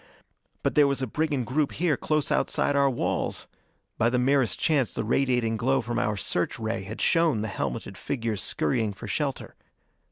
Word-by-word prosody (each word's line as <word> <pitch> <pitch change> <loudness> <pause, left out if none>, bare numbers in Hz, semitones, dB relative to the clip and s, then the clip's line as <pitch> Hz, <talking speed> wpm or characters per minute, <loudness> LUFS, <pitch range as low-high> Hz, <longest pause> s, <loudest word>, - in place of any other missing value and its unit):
But - - +1
there 145 -1 +5
was 140 -1 -1
a - - +2
brigand 145 0 -1
group 140 +3 0
here 165 -3 +1
close 155 +2 -1
outside 145 - +1
our 140 -1 +4
walls! 125 - -1 0.5
By 115 - +4
the 125 - +1
merest 130 -1 +2
chance 145 -6 +1
the - - -1
radiating 120 -1 +1
glow 135 +5 +2
from 120 +1 -2
our 105 -4 0
search 90 -2 -1
ray 115 -2 -2
had 105 +4 -7
shown 165 -9 +3
the - - -2
helmeted 95 - -4
figures 115 -6 -2
scurrying 110 -5 0
for - - -9
shelter. - - -3
125 Hz, 180 wpm, -26 LUFS, 110-140 Hz, 0.5 s, there